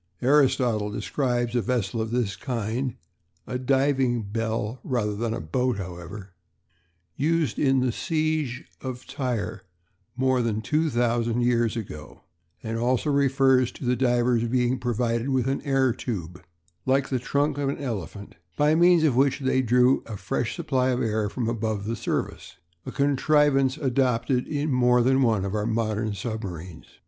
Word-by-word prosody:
Aristotle 125 -6 +3
describes 120 +2 -1
a 120 - +3
vessel 115 -3 -1
of 110 - -3
this 115 -5 -1
kind 120 0 -3 0.5
(a 125 - -4
diving 130 -2 +1
bell 110 +2 -3
rather 110 -6 -1
than 115 +2 -2
a - - -2
boat, 125 +9 -1
however), 90 +1 -8 0.8
used 160 +1 0
in 135 -2 +3
the 125 -1 +1
siege 155 -3 -1 0.2
of 130 -1 -6
Tyre 120 -8 -3 0.5
more 130 0 +2
than 110 -2 -1
two 155 +4 +1
thousand 120 -1 +1
years 120 -1 +1
ago; 75 -9 -8 0.4
and 115 0 -3
also 125 +5 +1
refers 135 -2 +3
to - - -8
the 125 +1 +2
divers 120 -2 +2
being 125 +1 +1
provided 120 +1 -1
with 130 -3 +1
an 135 +1 -1
air 135 -3 +2
tube, 90 -8 -5 0.4
"like 135 +1 +2
the 130 - 0
trunk 145 +3 0
of 140 -1 0
an 140 - -2
elephant," 105 -6 -5 0.2
by 150 +1 +4
means 170 0 +5
of 145 -6 +3
which 140 +2 +2
they 130 0 +2
drew 125 +2 +3
a 110 -3 -6
fresh - - -2
supply 130 -1 0
of 125 -1 0
air 110 -2 0
from 120 +1 -3
above 110 -3 -2
the 115 +2 -2
surface - - -4 0.3
a - - -3
contrivance 140 -1 +2
adopted 130 -2 +1
in 145 0 -1
more 125 -1 +4
than 130 +2 +3
one 110 -6 +2
of 100 - -3
our 105 0 -1
modern 110 -1 -1
submarines. 95 -6 -6
125 Hz, 155 wpm, -25 LUFS, 110-135 Hz, 0.8 s, means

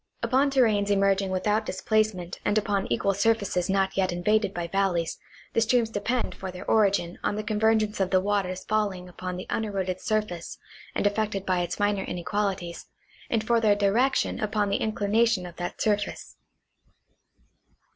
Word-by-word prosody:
Upon 260 +5 +3
terranes 220 -7 +2
emerging 195 -1 +2
without 210 +4 +1
displacement 210 -3 -1
and 210 - +1
upon 205 -2 0
equal 195 +11 +1
surfaces 200 -3 +1
not 195 0 +1
yet 190 -2 +1
invaded 205 +3 +1
by 175 -2 -4
valleys, 180 -3 0 0.3
the 230 - +2
streams 230 0 +2
depend 235 +4 -1
for 190 - -7
their 180 0 -8
origin 200 -5 +2
on - - 0
the 215 - -3
convergence 215 0 +1
of 190 -1 +1
the 185 - +4
waters 190 -2 -1
falling 200 -4 -1
upon 180 0 -6
the 185 - -6
uneroded 190 -4 -2
surface 210 -6 -2 0.4
and - - 0
affected 205 -1 0
by 185 -1 +1
its 175 +2 -3
minor 205 -1 +1
inequalities, 185 -1 -3 0.4
and 220 -2 0
for 235 0 +3
their 210 -2 +4
direc 220 +7 +2
tion - - 0
upon 210 -1 0
the 200 - +1
inclination 215 -1 +1
of 175 -1 -10
that 175 +1 -5
surface. 205 -1 -1
205 Hz, 160 wpm, -26 LUFS, 185-215 Hz, 0.4 s, the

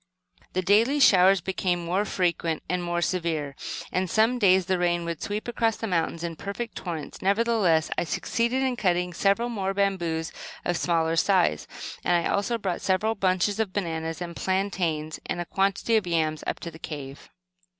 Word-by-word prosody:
The 185 - 0
daily 225 +9 +4
showers 190 -6 +6
became 180 -1 -1
more 185 +5 0
frequent 170 -4 -1
and 180 -1 -1
more 175 0 -1
severe, 160 -6 -1 0.4
and 185 0 0
some 225 +6 +3
days 190 -3 +5
the 185 0 0
rain 175 -1 +1
would 170 -2 -4
sweep 210 +3 -3
across 230 -2 0
the - - -4
mountain 170 -3 -1
in 165 -1 -4
perfect 220 +6 -5
torrents. 165 -5 -6
Nevertheless, 200 -5 +2
I - - 0
succeeded 235 +9 0
in 255 -2 0
cutting 180 -3 +1
several 200 +7 +2
more 195 -4 -2
bamboos, 175 -5 0 0.3
of 175 - +1
smaller 165 -1 +1
size, 175 - +2 0.4
and 175 - +3
I 170 - +1
also 205 +4 0
brought 190 -5 -3
several 210 +4 +1
bunches 195 +1 +1
of 210 -4 -1
bananas 165 -3 -3
and 170 -1 -7
plantains, 175 -6 -1
and - - -2
a 175 - -2
quantity 195 +5 +1
of 205 -4 -1
yams 160 -2 0
up - - -2
to 170 - -5
the 160 - -13
cave. 140 -4 -8
185 Hz, 175 wpm, -26 LUFS, 170-200 Hz, 0.4 s, showers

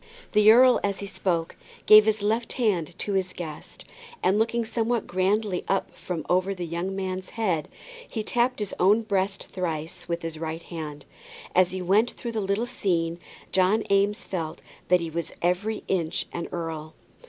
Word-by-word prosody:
The 210 0 +7
earl 250 +2 +7
as 200 -1 0
he 200 - -4
spoke 175 -4 -1 0.3
gave 215 0 +9
his 215 -1 +1
left 225 +3 0
hand 200 - 0
to 205 - -3
his 185 -1 0
guest, 155 -4 -8 0.4
and 190 +3 +3
looking 230 +1 +1
somewhat 230 +1 0
grandly 190 +1 0
up 195 - 0 0.4
over 185 +2 +1
the 180 -2 -4
young 170 +3 -3
man's 185 -1 -3
head, 185 -9 -1 0.4
he 220 - -3
tapped 245 +3 +1
his 210 -3 -4
own 205 +5 +4
breast 195 -2 -1
thrice 165 -4 -4
with 170 0 -2
his 165 -1 -5
right 160 +1 -4
hand. 150 -4 -7 0.5
As 185 -1 +5
he 185 0 -4
went 205 +6 +3
through 235 - -6
the 220 -2 -2
little 200 +4 0
scene, 170 -8 -1 0.3
John 190 +4 +3
Eames 205 +4 +2
felt 165 -3 -4 0.3
that 180 -1 +4
he 165 -1 -4
was 170 +1 -4
every 185 +5 0
inch 170 -4 0
an 170 - -3
earl. 160 -2 -5
190 Hz, 170 wpm, -26 LUFS, 170-215 Hz, 0.5 s, gave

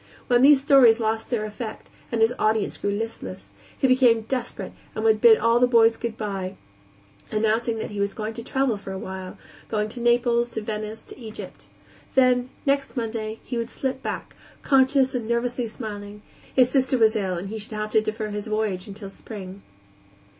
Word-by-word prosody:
When 245 -1 +3
these 280 +1 +7
stories 265 -5 +6
lost 220 0 -1
their 225 -4 -1
effect, 215 +1 -7 0.2
and 230 -2 0
his 225 +2 +4
audience 215 -1 +1
grew 205 - -2
listless, 225 +3 -5 0.3
he - - +1
became 255 -3 +5
desperate 245 +2 -4 0.2
and 220 - -3
would 220 -1 +3
bid 225 -2 +8
all 230 +2 +3
the 250 - +5
boys 230 -2 +5
good 230 -1 -5
by, 195 -3 -4 0.7
announcing 225 +2 +1
that 220 - -5
he 205 - -5
was 200 0 -1
going 215 0 -4
to 230 +1 -6
travel 265 -3 0
for 200 -1 -8
a 190 - -4
while; 190 -1 -7 0.3
going 210 -1 -1
to 240 - -8
Naples, 240 0 +2
to 220 - -4
Venice, 215 0 -5
to - - -13
Egypt. 220 -3 -9 0.5
Then, 255 -1 +4 0.2
next 275 -1 0
Monday, 225 -1 -3
he 245 - -4
would 230 0 -3
slip 265 0 -3
back, - - -5 0.3
conscious 265 -1 +4
and 240 -3 -3
nervously 240 +1 -1
smiling; 210 -2 -7 0.3
his 255 -1 +4
sister 260 -1 +2
was 220 -1 +4
ill, 190 -4 -1
and 180 +3 -5
he 220 +1 -5
should 215 +1 -9
have 215 0 -3
to 220 - +4
defer 215 0 -3
his 210 +1 -5
voyage 215 -3 -1
until 200 0 -8
spring. 195 -2 -9
225 Hz, 190 wpm, -24 LUFS, 215-245 Hz, 0.7 s, bid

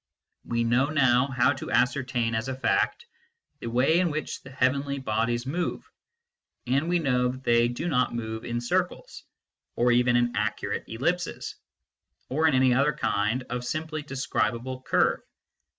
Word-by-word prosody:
We 115 0 -1
know 120 +4 +2
now 130 -4 +3
how 130 0 +2
to 135 - -7
ascertain 125 -3 +1
as 110 +2 -1
a 130 - -3
fact 135 - 0 0.5
the - - -6
way 130 +8 +3
in 180 -2 +2
which 155 0 -4
the 130 - -12
heavenly 140 +2 0
bodies 120 -1 -1
move, 170 +7 -3 0.8
and 140 +6 +1
we 175 - +3
know 125 -6 +1
that 130 +1 -5
they 120 0 +4
do 120 +8 -4
not 125 -7 +1
move 110 -1 -4
in 120 0 -3
circles, 120 - -2 0.5
or 120 +1 +3
even 120 0 +3
in 120 0 +2
accurate - - -2
ellipses, 170 +10 -2 0.8
or 155 +4 +2
in 150 - +3
any 130 -1 +4
other 140 +4 +3
kind 105 +5 0
of 125 0 -3
simply 155 +4 -3
de 140 -2 -9
scribable 130 -1 -2
curve. - - +2
130 Hz, 160 wpm, -26 LUFS, 120-140 Hz, 0.8 s, they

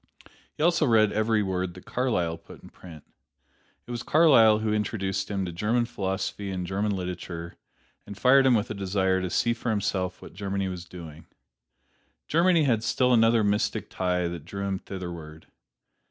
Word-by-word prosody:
He - - -3
also 170 -2 +3
read 110 -3 +4
every 110 0 +1
word 90 -2 -2
that 90 - -13
Carlyle 90 -10 -1
put 85 - -15
in - - -12
print. 80 -5 -13 0.8
It - - -9
was 120 -1 -4
Carlyle 130 -10 +5
who 110 0 -1
introduced 95 -2 -2
him 100 -2 -2
to 90 - -5
German 110 +7 0
philosophy 95 -2 -3
and 90 -1 -3
German 100 +3 -1
literature, 90 -2 -6 0.5
and 100 -1 -8
fired 135 +4 +5
him 125 - +5
with 110 +1 -1
a - - -2
desire 95 -1 0
to 90 - -3
see 115 +6 +1
for 115 0 -4
himself 95 -3 -1
what - - -12
Germany 100 0 -3
was 90 -1 -6
doing. 80 -3 -11 1.0
Germany 170 0 +3
had 115 -6 +1
still 125 +1 +2
another 115 -1 +4
mystic 105 0 -1
tie 90 -1 0
that 85 -3 -6
drew 100 +3 -6
him 95 -1 -2
thitherward. 85 -5 -8
100 Hz, 170 wpm, -26 LUFS, 90-115 Hz, 1.0 s, Carlyle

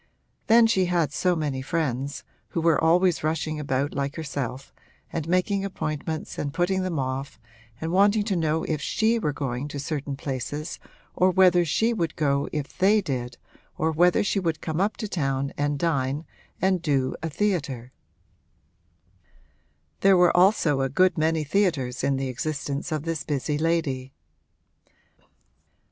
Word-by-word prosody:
Then 230 +1 +7
she 195 -5 +3
had 170 -5 0
so 180 +4 +1
many 145 -5 -2
friends, 140 -3 -2 0.2
who 165 - -3
were 165 -1 +3
always 175 +1 +3
rushing 155 0 -1
about 140 0 -1
like 140 +1 -2
herself 140 -4 -5 0.4
and 160 -2 -3
making 190 +2 +1
appointments 155 -4 -4
and 145 - -2
putting 185 +4 0
them 185 -3 -2
off 135 +1 -3 0.4
and 160 +1 -3
wanting 205 +3 +4
to 205 -2 -1
know 160 -1 0
if 155 -2 -2
she 225 +8 +1
were 150 -9 0
going 135 -1 -3
to 145 - -6
certain 140 -1 -3
places 145 +4 -4 0.3
or 185 - +3
whether 180 -1 +5
she 220 +9 +1
would 165 -8 -2
go 140 -2 0
if 150 -2 -4
they 200 +4 +4
did 125 -8 -4 0.4
or 160 +1 +1
whether 175 +3 +3
she 200 0 0
would 165 -4 -1
come 160 +2 -2
up 205 +2 0
to 220 - -4
town 140 -6 -1
and 145 0 0
dine 140 -1 -1 0.3
and 185 -1 +2
'do 135 -5 0
a 165 - -2
theatre.' 140 - -2 2.1
There 195 -1 +5
were 175 0 +4
also 175 -7 +4
a 135 - 0
good 185 +7 +3
many 160 -1 +1
theatres 145 -7 0
in 140 - +2
the 135 0 -2
existence 140 +3 -3
of 155 -2 -2
this 165 -2 -3
busy 145 0 -2
lady. 155 -6 -1
155 Hz, 155 wpm, -25 LUFS, 140-180 Hz, 2.1 s, Then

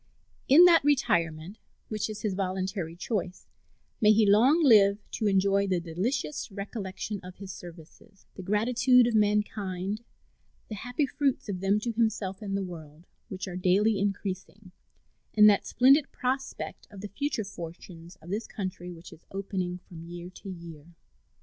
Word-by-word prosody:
In 315 +7 +8
that 335 -4 +6
retirement 170 - 0 0.3
which 215 -1 -3
is 215 - -7
his 210 -3 0
voluntary 185 -2 -3
choice 185 -1 -4 0.6
may 210 -1 +6
he 215 0 +4
long 250 +11 +5
live 205 -7 +6
to 215 - -1
enjoy 200 0 +2
the 185 -2 +1
delicious 215 - -3
recollection 200 0 -5
of 180 0 -10
his 195 -1 -8
services, 175 +3 -14
the - - -9
gratitude 240 +5 +3
of 240 - 0
mankind, 210 -2 0 0.7
the - - -5
happy 245 +7 -2
fruits 275 -4 -1
of 185 -2 -3
them 195 +2 +2
to 235 - -2
himself 220 -3 -1
and 195 -2 -2
the 200 - -2
world, 160 -3 -10 0.2
which 190 0 -6
are 180 - -6
daily 195 +4 +2
increasing, 195 -1 -4 0.6
and 210 -1 +8
that 205 -2 +4
splendid 275 +4 +4
prospect 260 +1 -4
of 200 -2 -11
the 210 - -5
future 275 -1 -2
fortunes 170 -1 -10
of 175 - -9
this 215 +3 -3
country 185 -3 -6
which 170 0 -12
is 155 - -19
opening 185 -2 -3
from 175 -2 -13
year 175 +1 -8
to 195 - -11
year. 170 -2 -10
200 Hz, 155 wpm, -28 LUFS, 180-220 Hz, 0.7 s, In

